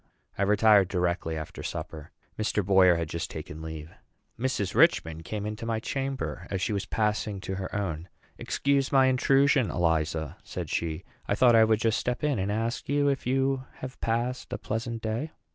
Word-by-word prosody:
I - - -4
retired 105 -1 +5
directly 90 -3 -1
after 80 - -7
supper. 75 -2 -6 0.2
Mr. 105 -2 -1
Boyer 95 -2 +6
had 85 -1 -2
just 85 +1 -4
taken 80 - -7
leave. 80 -1 -7 0.5
Mrs. 120 -6 -1
Richman 95 - +3
came 105 +5 -5
into 105 +1 -5
my 115 -1 0
chamber 135 -8 -3
as 95 - -2
she 105 - -1
was 100 -1 -2
passing 105 -2 -1
to 95 - -4
her 95 0 -5
own. 90 -4 -3 0.3
"Excuse 140 -1 0
my 135 -1 +5
intrusion, 135 0 +3
Eliza," 80 -3 0
said - - -6
she. 80 +1 -2 0.2
"I 100 - +1
thought 120 +1 +5
I 110 0 +7
would 110 0 +2
just 110 -1 +2
step 125 +2 -2
in 145 -7 +1
and 95 +2 -1
ask 115 +4 -2
you 145 0 +3
if 135 -3 -2
you 135 0 +1
have 130 0 -9
passed 120 +3 -1
a - - -2
pleasant 115 +1 -4
day." 115 +8 -3
105 Hz, 180 wpm, -28 LUFS, 90-125 Hz, 0.5 s, I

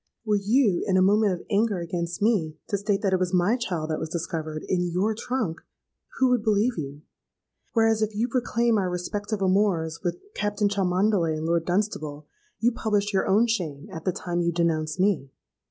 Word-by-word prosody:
Were 210 -1 +2
you, 215 -3 +3
in 190 -2 +3
a - - +5
moment 205 +1 +4
of 175 - -7
anger 210 0 +2
against 170 +2 -3
me, 185 -9 +1
to 200 - +1
state 205 0 0
that 195 -2 +2
it 185 - +3
was 185 0 0
my 180 +6 +3
child 175 -10 -3
that 155 - -1
was 160 - -4
discovered 160 -2 -4
in 180 -1 0
your 190 +6 +1
trunk, 225 -6 -3 0.6
who 260 -1 +4
would 250 -3 +3
believe 220 +3 +2
you? 145 -1 -6 0.7
whereas, 225 -1 +3
if 215 -1 -1
you 225 +3 +1
proclaim 235 -2 +1
our 185 -2 0
respective 205 +4 -3
amours 185 -4 +1
with 175 -2 -1 0.2
Captain 205 0 0
Cholmondeley 190 -3 +1
and 155 - -4
Lord 165 0 +1
Dunstable, 155 -6 -2 0.3
you 235 +2 +3
publish 210 -3 -1
your 190 - +1
own 210 +5 +4
shame 175 -7 -3
at 160 -2 -6
the 185 - +1
time 175 0 -3
you 170 0 +1
denounce 160 -1 0
me. 185 -8 +1
190 Hz, 190 wpm, -25 LUFS, 170-215 Hz, 0.7 s, a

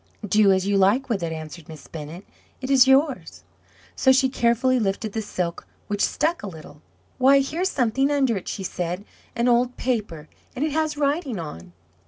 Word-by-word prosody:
"Do 205 +1 +4
as 190 0 +1
you 200 0 +1
like 220 +8 +2
with 210 -5 -1
it," 165 -1 -3
answered 160 0 -8
Miss 155 -3 -11
Bennett; 160 +4 -9 0.3
"it 260 +1 -4
is 265 -1 +6
yours." 270 +1 +1 0.5
So 265 - +4
she 265 0 +3
carefully 250 +1 +2
lifted 205 0 -2
the 225 - -2
silk, 180 -5 -4 0.2
which 205 0 -3
stuck 330 +2 0
a - - -6
little. 160 -4 -11 0.4
"Why, 275 +2 +6
here's 335 +7 -1
something 265 -1 +1
under 275 -5 +1
it," 190 - -6
she 195 - -4
said 180 +2 -4 0.3
"an 235 +1 +1
old 245 +1 +2
paper, 210 -11 -3 0.3
and 270 +4 -1
it 310 - -2
has 310 0 -1
writing 285 - -1
on." 85 - -8
230 Hz, 185 wpm, -23 LUFS, 185-270 Hz, 0.5 s, is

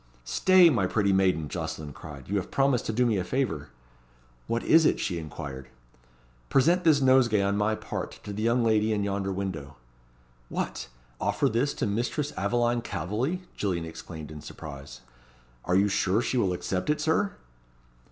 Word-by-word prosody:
"Stay, 185 - +5
my 100 -8 +1
pretty 100 0 +1
maiden," 95 -5 +2
Jocelyn 75 0 -5
cried; 70 -3 -10
"you 100 - 0
have 95 - -3
promised 135 -3 +1
to - - 0
do 125 +3 +2
me 115 -4 +2
a 90 - 0
favour." 90 - -2 0.8
"What 115 0 -1
is 160 +1 +6
it?" - - +3
she 85 -2 -2
inquired. 70 -4 -7 0.8
"Present 170 +7 +3
this 155 -4 +4
nosegay 130 -6 +4
on 100 +1 +1
my 105 +1 +1
part - - -6
to 105 - -6
the 105 - -4
young 115 +2 +2
lady 110 -1 +2
in 105 -1 0
yonder 100 -1 -1
window." 95 -7 -4 0.7
"What! - - -3 0.3
offer - - +1
this 120 +6 0
to - - -1
Mistress 120 +8 -1
Aveline 120 +4 +1
Calveley?" 115 - -2
Gillian 90 -5 -1
exclaimed 80 -1 -9
in 75 -1 -8
surprise. 70 -6 -9 0.6
"Are 90 - +1
you 100 +2 +4
sure 100 0 +1
she 120 - -1
will 95 -5 +1
accept 90 +3 -3
it, 150 - +2
Sir?" 160 +6 +1
105 Hz, 170 wpm, -27 LUFS, 90-125 Hz, 0.8 s, is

